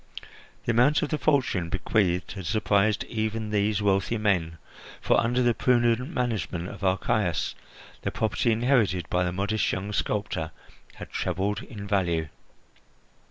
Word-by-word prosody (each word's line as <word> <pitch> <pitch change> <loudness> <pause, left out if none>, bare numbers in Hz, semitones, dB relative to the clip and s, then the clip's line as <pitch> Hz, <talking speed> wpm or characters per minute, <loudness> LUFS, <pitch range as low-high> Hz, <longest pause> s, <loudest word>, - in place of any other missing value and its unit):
The - - +2
amount 125 +7 +4
of 150 - -1
the 155 - -1
fortune 130 - +1
bequeathed 90 -1 0
had 95 -4 -6
surprised 105 -1 +2
even 110 -1 -3
these 105 0 +1
wealthy 100 +3 +1
men, 90 -7 0 0.4
for - - +3
under 125 +2 +1
the 120 -1 +3
prudent 120 +1 +2
management 110 - -2
of 100 -1 -10
Archias 95 -2 +1 0.5
the - - -1
property 110 +3 0
inherited 110 - +2
by 90 0 +2
the 90 - -1
modest 100 +4 0
young 100 +3 -3
sculptor 100 -7 -1 0.5
had - - -10
trebled 95 +4 -1
in 105 -5 -8
value. 85 -6 0
105 Hz, 140 wpm, -26 LUFS, 95-115 Hz, 0.5 s, amount